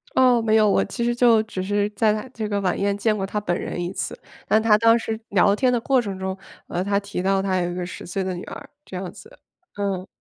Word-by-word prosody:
哦， 250 -2 +5
没 220 -1 +2
有， 215 -1 +5
我 - - +3
其 235 +4 -4
实 240 0 +1
就 235 -2 +5
只 215 -4 -5
是 205 +2 0
在 215 +1 +2
他 215 +4 -4
这 220 -2 -3
个 205 -1 -1
晚 185 -2 0
宴 200 0 0
见 215 +1 +1
过 195 -2 -2
他 210 +2 -2
本 175 -4 -1
人 - - -4
1 175 +1 -3
次， - - -4 0.3
那 215 - +4
他 220 -1 +4
当 230 +1 +5
时 225 -1 -4
聊 200 +1 +4
天 255 +3 +2
的 245 - +1
过 260 +2 +2
程 200 -4 -5
中， 190 0 -4 0.3
呃， 180 - -2
他 200 +1 +1
提 200 -2 -5
到 195 +1 +2
他 190 -1 0
有 175 0 -1
一 - - -5
个 180 -1 -3
10 180 - -8
岁 190 +2 -3
的 185 0 -2
女 175 - -6
儿， - - -9 0.2
这 - - -9
样 180 -1 -5
子。 455 +3 -15 0.4
嗯。 195 -2 -2
205 Hz, 275 characters per minute, -23 LUFS, 190-225 Hz, 0.4 s, 哦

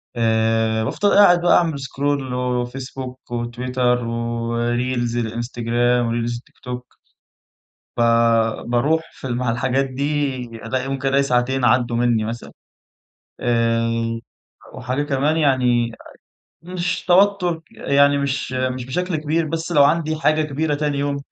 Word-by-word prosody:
آآ 110 -1 +1
بافضل 205 - 0
قاعد 180 -4 +6
بقى 175 - +5
أعمل 165 -5 0
سكرول 135 0 -2
وفيسبوك، 125 +1 -4
وتويتر، 125 +1 -1
وريلز 120 +1 -1
الإنستجرام، 120 +1 0
وريلز 120 +1 -1
التيك 120 - -18
توك، 125 -1 -7 1.0
فباروح 115 +5 +2
في - - -8
مع 120 -1 -1
الحاجات 130 +3 0
دي 140 +1 -1 0.3
ألاقي 130 +3 -2
ممكن 135 0 -2
ألاقي 140 +1 +3
ساعتين 125 0 +1
عدّوا 120 -1 +2
مني 120 -2 +2
مثلًا، 115 +2 -6 0.9
آآ، 115 -1 0 0.6
وحاجة 130 +2 -2
كمان 145 +2 0
يعني 125 -6 +2 0.7
مش 180 +1 -3
توتر 180 -2 +3
يعني 140 0 +3
مش 140 -2 -2
مش 130 -1 -2
بشكل 180 +7 -2
كبير 155 +2 0
بس 165 +2 -3
لو 145 -4 +6
عندي 155 +1 +2
حاجة 155 0 +2
كبيرة 150 +1 -1
تاني 145 -1 -1
يوم 140 0 -1
125 Hz, 120 wpm, -21 LUFS, 120-145 Hz, 1.0 s, قاعد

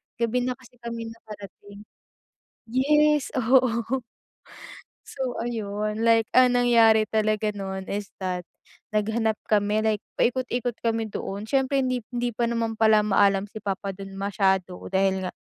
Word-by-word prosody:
gabi 235 +1 0
na 250 0 -1
kasi 250 -1 -20
kami 230 -1 -5
nakarating. 205 -2 -12 0.9
Yes, 300 +3 +3
oo. 250 0 +2 1.0
So, 260 -3 -4
ayun, 215 -2 -3
like 225 -1 +4
ang 250 -1 +6
nangyari 225 -3 +5
talaga 215 0 0
nun 190 -1 -5
is 200 0 -4
that, 180 -2 -3 0.5
naghanap 220 +1 +1 0.2
kami 210 0 +2
like 215 -1 0 0.2
paikot-ikot 245 -1 0
kami 225 -1 0
doon. 200 +1 -5
Siyempre 270 0 +1
hindi 255 -2 -1
p - - -78
hindi 245 0 -1
pa 240 - +1
naman 230 -1 -1
pala 220 -1 +5
maalam 200 -1 +3
si 215 +1 -10
papa 195 0 -3
dun 195 -1 -9
masyado 190 -2 0 0.2
dahil 190 0 +1
nga - - -4
220 Hz, 140 wpm, -25 LUFS, 205-245 Hz, 1.0 s, ang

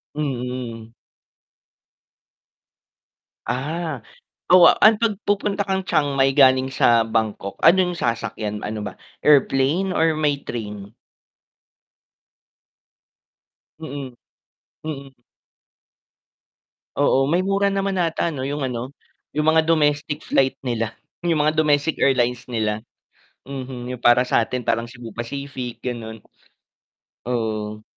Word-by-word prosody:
Mm. 125 -5 -4 2.5
Ah 150 +4 -3 0.5
oo 180 -2 +9
ang 220 0 +7
pag 215 -4 +1
pupunta 205 0 0
kang 190 0 0
Chiang 145 -6 0
Mai 135 0 +3
galing 130 -1 +4
sa 115 -3 +4
Bangkok, 110 -3 -2
ano 170 +4 +6
'yong 180 -1 -3
sasakyan 110 -2 -2
ano 105 0 -4
ba - - -8 0.3
airplane 145 +6 +3
or 160 -2 +2
may 150 -2 0
train? 105 -2 -6 2.9
Mhm, 140 -5 -7 0.7
mhm. 140 -3 -7 1.8
Oo 135 -1 +3
may 170 +6 +2
mura 200 +1 +1
naman 195 -1 -1
ata 170 -1 0
'no 135 -4 -4
yung 145 +1 -3
ano, 125 0 -4 0.4
'yong 150 +1 0
mga 160 0 +5
domestic 150 -2 +1
flight 135 -1 +2
nila, 115 -3 -2 0.3
'yong 165 -3 +2
mga 155 +1 +1
domestic 150 0 +2
airlines 125 -2 +1
nila, 110 -2 -2 0.6
mhm 130 -2 -7
'yong 125 -1 -7
para 120 +1 +6
sa 125 - +1
atin 125 +2 -1
parang 115 +1 0
Cebu 120 -1 -10
Pacific 125 +1 -6
gano'n. 115 -3 -6 1.0
Oo. 110 -3 -3
135 Hz, 110 wpm, -22 LUFS, 120-155 Hz, 2.9 s, oo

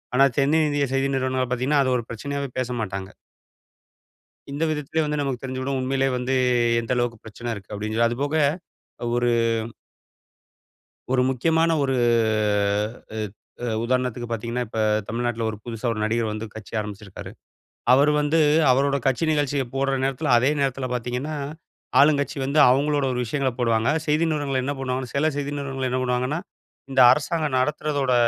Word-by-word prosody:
ஆனா, 135 +2 +6
தென்னிந்திய 145 0 +2
செய்தி 135 +1 +1
நிறுவனங்கள் 130 -1 -1
பாத்தீங்கன்னா, 135 +3 +2
அது 130 -1 +2
ஒரு 120 - -5
பிரச்சனையாவே 140 +4 -4
பேச 130 -1 -2
மாட்டாங்க. 95 -2 -4 1.4
இந்த 145 +3 -2
விதத்திலே 155 +1 -1
வந்து 150 0 -2
நமக்கு 135 -4 -2
தெரிஞ்சு 130 0 -4
விடும் 135 +1 -1
உண்மையிலே 135 +1 +1
வந்து, 125 +1 -2 0.5
எந்த 115 +1 -4
அளவுக்கு 120 -1 -1
பிரச்சன 115 +2 -6
இருக்கு 100 -3 -10
அப்பிடின்னு 105 +2 -3
சொல்லி. 115 0 +4
அதுபோக 145 +6 0 0.8
ஒரு 120 0 +2 1.8
ஒரு 130 -1 +3
முக்கியமான 160 +6 +2
ஒரு 135 -1 0 1.2
அ - - -4 0.7
உதாரணத்திற்கு 125 -1 -1
பார்த்தீங்கன்னா, 115 +2 -2
இப்ப 110 - -5 0.3
தமிழ்நாட்ல 115 0 -2
ஒரு 105 - -5
புதுசா 115 -1 -6
ஒரு 110 - -5
நடிகர் 115 +1 0
வந்து 110 +1 -4
கட்சி 110 -2 -10
ஆரம்பிச்சிருக்காரு. 105 -2 -7 0.6
அவரு 140 +3 +5
வந்து 150 +2 +2 0.3
அவரோட 140 +2 +2
கட்சி 135 +4 +1
நிகழ்ச்சிய 145 -2 +1
போட்ற 135 0 +1
நேரத்தில 135 -1 0
அதே 125 +4 +3
நேரத்தில 135 -1 -1
பார்த்தீங்கன்னா, 125 +5 -3 0.6
ஆளும் 145 0 +5
கட்சி 140 +1 -4
வந்து 140 +3 +1
அவுங்களோட 145 +2 +2
ஒரு 125 - -2
விஷயங்களப் 130 0 -1
போடுவாங்க. 115 -1 +2 0.2
செய்தி 150 +2 +2
நிறுவனங்கள் 145 -4 -1
என்ன 140 +2 -1
பண்ணுவாங்கன்னா 130 -1 -3
சில 155 +3 +2
செய்தி 145 0 -3
நிறுவனங்கள் 135 -2 -3
என்ன 130 +1 0
பண்ணுவாங்கன்னா, 125 +4 0 0.5
இந்த 130 -1 +4
அரசாங்கம் 150 0 0
நடத்துறதோட 145 -1 0
130 Hz, 150 wpm, -24 LUFS, 120-140 Hz, 1.8 s, ஆனா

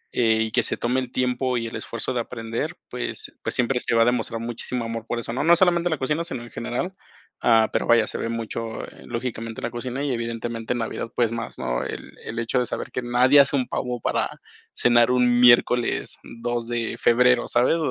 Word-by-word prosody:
eh, 110 -2 +3
y 110 - -4
que - - +3
se - - -1
tome 125 +2 0
el 130 -1 -5
tiempo 125 0 0
y 115 - -2
el 115 - -6
esfuerzo 115 +2 -2
de 125 - -1
aprender, 115 -1 -4
pues, - - -5
pues - - -2
siempre 125 +1 +1
se 115 - +1
va 115 - +6
a - - +2
demostrar 120 -1 0
muchísimo 120 +1 -3
amor 115 0 -5
por 120 - -2
eso, 115 0 -5
no, 130 - -1
no 170 +2 +6
solamente 175 -1 +3
en - - -4
la 160 - 0
cocina, 150 +5 -1
sino 120 -7 -5
en 120 - -12
general, 125 +11 -3 0.5
ah, 115 -2 +5
pero - - 0
vaya, 115 -2 +5
se - - -5
ve 115 - -2
mucho, 115 0 -4
eh, - - -14
lógicamente 115 -2 -4
en - - -11
la 115 - -2
cocina 125 +3 -4
y 145 - 0
evidentemente 115 0 -3
en - - -3
Navidad, 115 0 -4
pues, 115 -2 +2
más, 115 -1 -5
¿no?, - - -2
el - - -7
el 115 - -6
hecho 115 +2 0
de 125 - 0
saber - - -4
que 125 - -2
nadie 125 +3 +5
hace 140 0 +5
un 130 -2 +1
pavo 125 -2 -3
para - - 0 0.4
cenar 120 0 +4
un 125 -1 +3
miércoles 120 0 +4 0.3
2 120 -1 -2
de 120 -1 -2
febrero, 125 +1 +4
¿sabes?, 125 +7 +3
120 Hz, 230 wpm, -24 LUFS, 115-125 Hz, 0.5 s, va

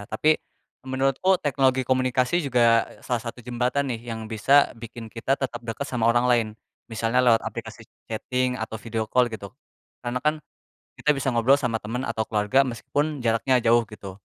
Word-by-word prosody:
Tapi, 155 +9 +2 0.5
menurutku 135 +8 +1
teknologi 135 -3 +2
komunikasi 130 +5 +1
juga, 115 -3 +4
eee, - - -18
salah 120 -2 -2
satu 120 +1 -6
jembatan 125 +3 -1
nih, 115 0 -6
yang 110 -1 -6
bisa 135 +6 +4
bikin 115 0 -9
kita, 120 +5 -1
tetap 125 -3 -3
deket 115 +4 -4
sama 120 -3 -1
orang 120 +1 +3
lain. 120 -3 +3 0.4
Misalnya, 115 +2 +1
lewat 115 -2 +5
aplikasi 115 -1 -7 0.2
chatting 125 +3 -1
atau 110 0 -4
video 110 -1 -4
call 125 -1 +3
gitu. 100 -2 -6 0.6
Karena 120 +1 -2
kan, 150 +2 +1 0.7
kita 150 -2 +2
bisa 135 - 0
ngobrol 120 +4 +4
sama 125 -5 -1
temen 125 +5 -4
atau 110 -1 -2
keluarga 105 +5 +3
meskipun 140 +5 -2
jaraknya 115 +3 +3
jauh 115 +1 +4
gitu. 100 -3 -10
120 Hz, 165 wpm, -25 LUFS, 115-130 Hz, 0.7 s, lewat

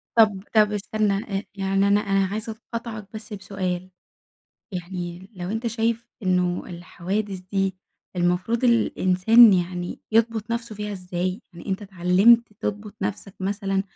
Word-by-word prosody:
طب 210 -4 +4
طب 210 -1 +5
استنى، 210 0 0 0.2
آآ 195 - -3
يعني 195 0 +1
أنا 205 +1 +4 0.2
عايزة 215 +3 -4 0.2
أقاطعك 225 -3 -5
بس 215 0 -8
بسؤال، 185 -2 -3 0.8
يعني 180 0 -5
لو 180 0 -5
أنت 225 +2 -2
شايف 230 +1 -1
إنه 180 -1 +1
الحوادث 185 +3 -4
دي، 195 -1 +1 0.4
المفروض 180 +8 +1
الإنسان 225 -1 +6
يعني 175 -1 -1
يضبط 225 -1 +2
نفسه 235 -1 -3
فيها 210 0 -4
إزاي؟ 180 +1 -3
يعني 170 - -11
أنت 195 +2 -1
اتعلَّمت 200 +5 +4
تضبط 210 0 -4
نفسك 195 0 -4
مثلًا، 195 0 -1
195 Hz, 130 wpm, -24 LUFS, 185-220 Hz, 0.8 s, الإنسان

